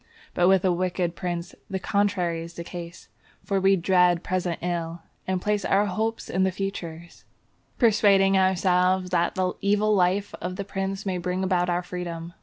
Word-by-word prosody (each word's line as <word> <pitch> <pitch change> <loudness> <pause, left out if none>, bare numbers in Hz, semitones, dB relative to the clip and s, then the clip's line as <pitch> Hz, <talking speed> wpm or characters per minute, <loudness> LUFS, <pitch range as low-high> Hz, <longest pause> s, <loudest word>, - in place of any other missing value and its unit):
But 175 - +3
with 190 0 +4
a 185 - +4
wicked 175 -1 -1
prince 175 -1 -4 0.2
the 190 - -2
contrary 185 -4 0
is 165 0 -9
the 170 - -6
case; 170 0 -9 0.4
for 195 -1 0
we 195 +1 +5
dread 180 -1 +3
present 180 -2 -1
ill, 170 -1 -3 0.2
and 185 -1 0
place 210 +1 -1
our 200 +2 +2
hopes 220 +3 -2
in 185 - -1
the 190 0 +3
future, 180 -4 -5 0.7
persuading 200 -4 +4
ourselves 185 -1 +2
that 170 0 +1
the 185 -1 0
evil 210 +1 +2
life 195 +1 +1
of 180 +1 -4
the 200 +1 -5
prince 195 0 -4
may 185 -2 -1
bring 180 +2 -2
about 180 -1 +1
our 175 0 0
freedom. 175 -1 -6
185 Hz, 175 wpm, -25 LUFS, 175-195 Hz, 0.7 s, we